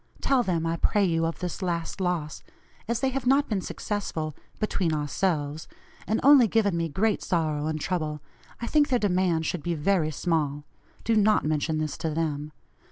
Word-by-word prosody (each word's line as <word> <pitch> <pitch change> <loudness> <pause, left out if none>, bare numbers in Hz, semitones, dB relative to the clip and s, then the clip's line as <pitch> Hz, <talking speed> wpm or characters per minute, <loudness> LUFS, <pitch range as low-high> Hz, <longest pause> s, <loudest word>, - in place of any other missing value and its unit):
Tell 270 -2 +2
them, 175 -7 -1
I 165 0 -1
pray 205 +4 +2
you, 165 -2 +1
of 165 - -4
this 180 +2 -4
last 175 0 -2
loss. 170 -5 -2 0.5
As 235 +1 -1
they 265 - +2
have 260 -1 -3
not 275 +2 +4
been 205 -4 -1
successful 165 -7 -4 0.2
(BETWEEN 185 -6 0
OURSELVES), 150 0 -1 0.4
and 220 - +1
only 275 -3 +7
given 205 -4 +2
me 165 -1 -1
great 205 +8 +1
sorrow 155 -3 0
and 155 0 -2
trouble, 155 -3 -2 0.4
I 235 - -4
think 295 +4 +3
their 255 - +3
demand 180 -6 +1
should 175 +1 -2
be 170 +3 -2
very 160 0 +1
small. 150 -2 -1 0.4
(Do 230 - +1
not 215 -3 +3
mention 155 +1 0
this 155 -1 -2
to 160 - -1
them.) 150 -1 -2
170 Hz, 180 wpm, -26 LUFS, 155-210 Hz, 0.5 s, only